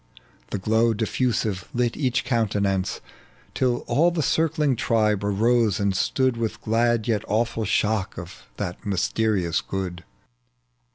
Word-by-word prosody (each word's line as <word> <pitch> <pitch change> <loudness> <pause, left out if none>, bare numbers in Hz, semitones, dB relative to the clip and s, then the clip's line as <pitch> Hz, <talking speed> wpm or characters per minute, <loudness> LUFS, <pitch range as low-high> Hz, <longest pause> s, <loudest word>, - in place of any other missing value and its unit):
The - - -2
glow 110 +4 +2
difi'usive 110 -3 -1
lit 120 -1 +1
each 130 -3 0
countenance. 100 -5 0 0.5
Till 125 -2 0
all 165 +4 +3
the 170 -3 -1
circling 150 -2 +1
tribe 110 -4 +1
arose 110 +1 +2
and 100 -2 +1
stood 130 +4 +1
With 115 -1 -2
glad 115 0 +1
yet 110 -4 +1
awiUl 110 0 0
shock 105 -2 0
of 85 0 -10
that 90 - -5
mysterious 100 -3 0
good. 90 -3 -5
110 Hz, 125 wpm, -24 LUFS, 100-120 Hz, 0.5 s, all